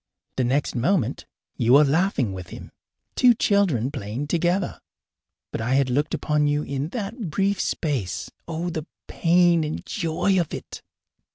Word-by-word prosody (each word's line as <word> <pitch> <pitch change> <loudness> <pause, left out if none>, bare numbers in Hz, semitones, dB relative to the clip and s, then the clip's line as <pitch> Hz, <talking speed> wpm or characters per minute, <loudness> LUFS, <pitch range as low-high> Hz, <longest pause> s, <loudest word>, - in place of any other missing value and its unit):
The 130 - +2
next 135 +4 0
moment 140 - 0 0.3
you 120 +1 +3
were 145 +2 +8
laughing 145 - +1
with 90 -1 -7
him - - -10 0.4
two 245 -2 +5
children 175 - +2
playing 110 +4 -4
together. 175 +3 0 0.7
But - - -3
I 125 +4 +1
had 135 -2 +2
looked 145 +4 0
upon 150 -1 +1
you 145 +1 +1
in 140 +1 -3
that 215 -1 -5
brief 195 +5 0
space. 135 - -2 0.2
Oh, 170 +1 -3
the 160 0 -5 0.2
pain 170 -1 +3
and 155 0 -4
joy 185 0 0
of 165 - -4
it! - - -9
155 Hz, 155 wpm, -24 LUFS, 135-180 Hz, 0.7 s, were